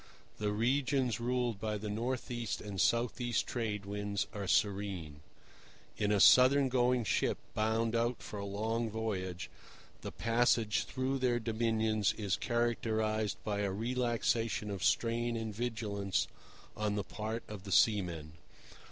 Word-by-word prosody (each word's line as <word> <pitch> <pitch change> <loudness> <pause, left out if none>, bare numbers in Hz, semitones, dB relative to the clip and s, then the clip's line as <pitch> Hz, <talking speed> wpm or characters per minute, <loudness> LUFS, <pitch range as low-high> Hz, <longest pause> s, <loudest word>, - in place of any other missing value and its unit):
The 105 -1 0
regions 125 +2 +1
ruled 120 -3 -1
by 110 0 -2
the 105 +1 -6
north 120 +5 -2
east 120 -7 -2
and 100 -3 -3
south 120 +1 +1
east 120 -1 0
Trade 105 -4 -3
Winds 100 0 -2
are 100 -2 -4
serene. 95 -7 0 0.7
In 105 -1 0
a 105 - +3
southern 130 +5 +7
going 125 -1 +2
ship, 105 - +1 0.2
bound 110 +1 +1
out 120 +1 0
for 105 - -6
a - - -4
long 110 +3 -1
voyage, 95 -5 -3 0.5
the - - -5
passage 115 -2 +2
through 135 +1 -2
their 125 -2 +2
dominions 110 -2 +1
is 100 -5 -1
characterized 110 -3 0
by 105 -1 -2
a 100 -1 0
relaxation 115 -1 0
of 95 -3 -4
strain 115 0 +1
and 110 -1 -4
vigilance 105 -4 -1 0.5
on 105 -1 -1
the 105 - -1
part 110 +3 -4
of 105 -3 -8
the 100 - -7
seamen. 85 -8 +2
110 Hz, 145 wpm, -33 LUFS, 105-120 Hz, 0.7 s, southern